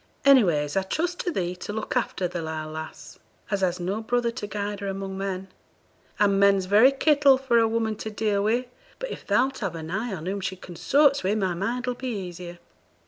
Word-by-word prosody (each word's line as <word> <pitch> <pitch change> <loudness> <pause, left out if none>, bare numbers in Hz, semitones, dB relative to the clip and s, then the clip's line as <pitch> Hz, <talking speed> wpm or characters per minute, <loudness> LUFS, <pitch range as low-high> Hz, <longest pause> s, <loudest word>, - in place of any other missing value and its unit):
Anyways, 175 - +4
I 195 - +3
trust 340 - -2
to 355 - -1
thee 180 - -2
to 195 - -6
look 220 0 -4
after 185 - 0
the 175 -1 -5
lile 155 -1 -5
lass, 155 0 -8 0.3
as 200 -1 0
has 180 -1 0
no 190 +5 -2
brother 240 +1 0
to 230 -3 -6
guide 205 0 -4
her 200 - -4
among 195 0 -4
men 190 -1 -4 0.7
and 200 -1 +3
men's 200 -1 +4
very 215 +8 +6
kittle 280 -1 +4
for 255 -3 +2
a 225 - +4
woman 225 -1 -1
to 220 - -5
deal 210 -1 0
wi; 230 +5 +1 0.3
but - - -5
if - - -6
thou'lt 255 +6 +2
have 190 -6 -3
an 160 0 -6
eye 220 +5 -2
on 170 -4 -5
whom 195 +2 -2
she 190 0 -3
consorts 275 - +2
wi', 195 +3 +1
my 190 -4 0
mind 235 +8 -2
'll 250 - -1
be 260 +1 -6
easier.' 180 -6 -6
200 Hz, 210 wpm, -25 LUFS, 185-240 Hz, 0.7 s, very